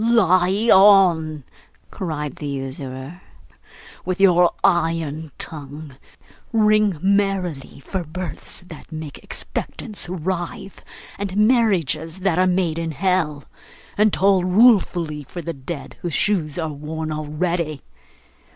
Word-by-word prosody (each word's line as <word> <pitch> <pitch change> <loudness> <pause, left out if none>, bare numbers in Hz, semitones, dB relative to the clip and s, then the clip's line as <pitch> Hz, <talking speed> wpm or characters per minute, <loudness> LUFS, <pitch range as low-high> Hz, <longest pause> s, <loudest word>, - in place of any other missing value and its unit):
'Lie 195 -2 +3
on!' 175 -7 +5 0.5
cried 150 -5 -4
the 150 - -5
usurer, 135 +3 -6 0.8
'with 185 0 -3
your 180 -3 +5
iron 165 -4 0
tongue! 145 -1 -4 0.6
Ring 215 -4 +3
merrily 190 -9 0
for 190 -2 -3
births 165 -1 -7
that 170 -2 -13
make 155 -2 -7
expectants 210 -5 -6
writhe, 180 +2 -4 0.4
and 200 -1 -3
marriages 190 - +2
that 180 -2 +1
are 185 - +4
made 180 -3 0
in 165 -1 -3
hell, 160 -3 0 0.5
and 210 +1 +3
toll 190 -1 +3
ruefully 180 -6 +3
for 175 +5 -8
the 170 - -4
dead 140 +2 -8
whose 175 -3 -3
shoes 170 -8 0
are 160 -3 -2
worn 155 +2 -5
already! 155 0 -2
175 Hz, 115 wpm, -21 LUFS, 155-190 Hz, 0.8 s, on